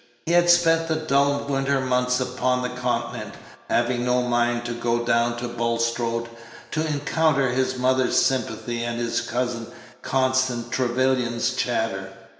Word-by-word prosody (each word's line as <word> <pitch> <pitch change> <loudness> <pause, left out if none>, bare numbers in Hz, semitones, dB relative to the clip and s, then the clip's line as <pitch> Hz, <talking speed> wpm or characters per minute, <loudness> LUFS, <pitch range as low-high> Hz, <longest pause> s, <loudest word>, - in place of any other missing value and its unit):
He 165 - -1
had 175 0 +4
spent 165 -1 +4
the 160 - 0
dull 140 -2 +1
winter 135 0 +1
months 125 -1 +1
upon 125 0 0
the 125 - -1
Continent, 125 0 -3 0.3
having 120 +1 +1
no 125 0 +2
mind 120 0 0
to 120 - -3
go 120 0 -1
down 120 0 +1
to 120 +1 -4
Bulstrode 115 0 -1 0.4
to 155 +1 -1
encounter 145 -2 +1
his 130 +1 0
mother's 130 0 +2
sympathy 120 -2 -1
and 120 0 -3
his 120 0 -1
cousin 120 -1 -3 0.3
Constance 130 -2 +1
Trevyllian's 125 -1 0
chatter. 110 -7 -2
125 Hz, 140 wpm, -24 LUFS, 120-130 Hz, 0.4 s, had